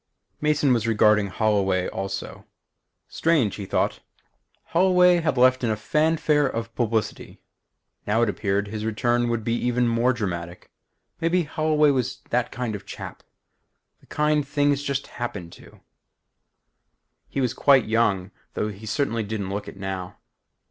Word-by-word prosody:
Mason 150 -3 +3
was 115 -2 0
regarding 105 -2 +4
Holloway 95 -3 +1
also. 95 0 -5 0.6
Strange, 155 -11 +1
he 100 -2 -6
thought; - - 0 0.7
Holloway 180 0 +5
had 160 -5 0
left 130 +1 +4
in 120 - +1
a 110 - +1
fanfare 150 +4 +2
of 115 -1 -4
publicity. 115 -2 -2 0.7
Now 110 +3 +2
it - - +2
appeared 100 0 -1
his 110 0 -5
return 120 +2 0
would 115 -2 -1
be 115 - -1
even 120 0 +1
more 115 +2 +2
dramatic. 90 -7 -5 0.5
Maybe 170 +2 +2
Holloway 150 -1 +2
was 130 -1 -2
that 125 0 0
kind 125 -3 -3
of 105 - -5
a - - -27
chap; - - -8 0.8
the - - -25
kind 150 -1 +1
things 145 -1 +1
just 140 -1 -2
happened 100 -8 -6
to. - - -16 1.5
He - - -3
was 125 -3 0
quite 135 -4 +4
young 105 -4 +1 0.2
though 105 - -1
he 105 +2 -9
certainly 115 -1 0
didn't 100 -2 -4
look 100 +1 -4
it - - -9
now. 95 -2 -5
115 Hz, 150 wpm, -24 LUFS, 105-145 Hz, 1.5 s, Holloway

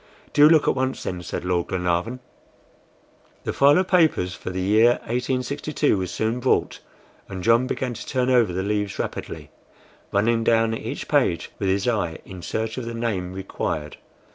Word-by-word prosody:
"Do 150 +1 +7
look 160 -2 +4
at - - +4
once, 130 0 -2
then," 90 -1 -4
said 90 - -5
Lord 90 -1 0
Glenarvan. 90 +7 -1 1.2
The - - -3
file 140 +3 +5
of 185 0 +1
papers 160 - +2
for - - -7
the 90 0 -4
year 110 +6 +4
1862 130 +4 -1
was 95 -2 -2
soon 110 +6 -1
brought, - - +1 0.5
and 95 -2 -6
John 115 +4 +4
began 130 -1 -2
to - - -9
turn 130 -1 0
over 120 -6 +4
the 95 +2 -2
leaves 105 0 -2
rapidly, - - -5 0.6
running 115 +3 +2
down 115 0 +3
each 115 +4 -5
page 130 - +1
with 95 - 0
his 100 +3 0
eye 90 -9 0
in 95 -2 -9
search 110 +6 -3
of 125 - -6
the 115 0 -5
name 105 -6 -2
required. 80 -5 -4
115 Hz, 170 wpm, -23 LUFS, 95-125 Hz, 1.2 s, Do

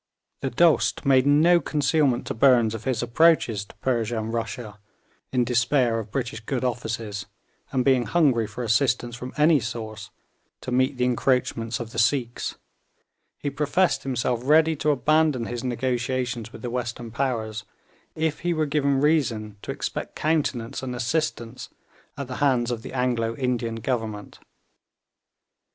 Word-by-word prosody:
The 135 - -2
Dost 160 +4 +2
made 135 -1 +4
no 160 +5 +5
concealment 145 -4 +1
to - - -3
Burnes 120 -2 +4
of 115 -1 -7
his 125 -3 0
approaches 120 -5 +3
to - - -17
Persia 120 -3 -1
and 110 +1 -3
Russia, 115 -2 -4 0.5
in 125 -1 +2
despair 120 0 +2
of 110 -1 -7
British 120 0 -3
good 125 +3 -3
offices, 115 -4 -3 0.4
and 130 -2 0
being 130 -3 +3
hungry 135 -10 +2
for 110 +4 -6
assistance 120 +1 +1
from 125 +1 -7
any 150 0 +5
source 110 -2 -6 0.5
to - - -6
meet 130 +1 +1
the 125 - +1
encroachments 125 -2 0
of 115 -2 -6
the 115 - -3
Sikhs, 120 +1 0 0.8
he 145 - -3
professed 150 +6 +1
himself 125 -2 -1
ready 160 +3 +4
to 150 - 0
abandon 150 -2 +2
his 120 0 -5
negotiations 125 -2 -2
with - - -11
the 120 - -3
western 120 -1 -4
powers 115 -4 -2 0.5
if 160 -1 -1
he 175 -1 -1
were 155 -1 +1
given 140 -2 +1
reason 115 -9 +1
to - - -11
expect - - -5
countenance 140 -6 -1
and 130 -2 -4
assistance 120 -2 -2 0.5
at 140 -2 -5
the 125 - -6
hands 125 -4 +2
of 115 -2 -3
the - - -8
Anglo 120 -3 0
Indian 120 -3 -1
Government. 110 -3 -4
125 Hz, 150 wpm, -25 LUFS, 115-140 Hz, 0.8 s, no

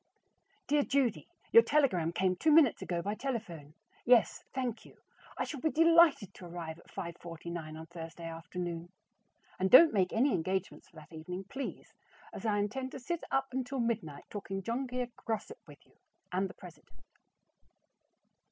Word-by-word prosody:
Dear 295 0 +3
Judy: 270 -5 0 0.2
Your 460 - +10
telegram 255 - +2
came 185 +1 +1
two 310 - +2
minutes 295 -7 +5
ago 170 -1 -2
by 205 - -1
telephone. 210 - -5 0.3
Yes, 240 -2 +4
thank 245 -4 -3
you, - - -17 0.4
I - - 0
shall 290 - -5
be 315 - +1
delighted 330 - +5
to 180 - -11
arrive 165 -1 -7
at - - -20
5:49 170 -3 -7
on 160 - -8
Thursday 165 0 -9
afternoon. 170 +1 -5 0.7
And 190 +1 +1
don't 310 - +9
make 185 -3 +2
any 260 +4 +2
engagements 190 +3 -2
for - - -26
that 155 +1 -13
evening, 180 +4 -6
please, 270 +7 -7 0.4
as - - -5
I 210 -1 +2
intend 260 +6 -2
to - - -6
sit 340 +7 -4
up 270 0 0
until 260 +1 -3
midnight 215 -12 -2
talking 195 -2 -5
John 245 +6 -2
Grier 250 0 -3 0.2
gossip 225 - -3
with - - -15
you - - -28 0.4
and 190 +1 0
the - - -12
president. 165 - -14
200 Hz, 160 wpm, -32 LUFS, 170-260 Hz, 0.7 s, Your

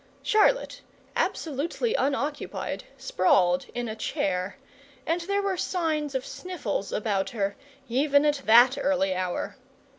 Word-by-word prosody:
Charlotte, 435 +4 +2 0.3
absolutely 330 - -1
unoccupied, 285 - -2
sprawled 185 -8 +2
in 240 0 -2
a 220 - -4
chair, 185 -3 -2 0.5
and 335 +2 0
there 400 +3 -1
were 390 -2 0
signs 310 -6 -1
of 265 - -1
sniffles 290 - -4
about 205 -3 0
her, 200 -3 -2 0.3
even 285 +4 +3
at 295 -1 +1
that 240 +4 +6
early 265 -10 +1
hour. 185 +6 -3
270 Hz, 120 wpm, -27 LUFS, 200-320 Hz, 0.5 s, that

